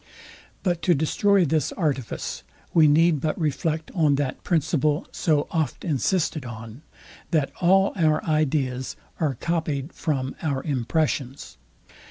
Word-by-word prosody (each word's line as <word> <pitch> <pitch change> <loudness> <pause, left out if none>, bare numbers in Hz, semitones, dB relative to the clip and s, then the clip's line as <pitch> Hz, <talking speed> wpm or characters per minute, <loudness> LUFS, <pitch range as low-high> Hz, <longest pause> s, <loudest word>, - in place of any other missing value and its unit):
But 175 -3 0
to 175 - +3
destroy 190 +6 +3
this 155 -1 0
artifice, 140 - -2 0.3
we 160 -2 +6
need 155 0 +4
but 155 +3 -1
reflect 155 +1 -1
on 155 -6 +3
that 140 -2 -3
principle 155 -2 +1
so 150 -4 +1
oft 160 -7 -2
insisted 160 0 0
on, 115 +1 -9 0.5
that 155 -5 +1
all 195 +2 +4
our 155 -4 +2
ideas 140 -5 0 0.2
are 150 -5 0
copyed 155 -1 -2
from 135 -4 -2
our 140 -5 -1
impressions. 140 0 -2
155 Hz, 125 wpm, -24 LUFS, 135-165 Hz, 0.5 s, we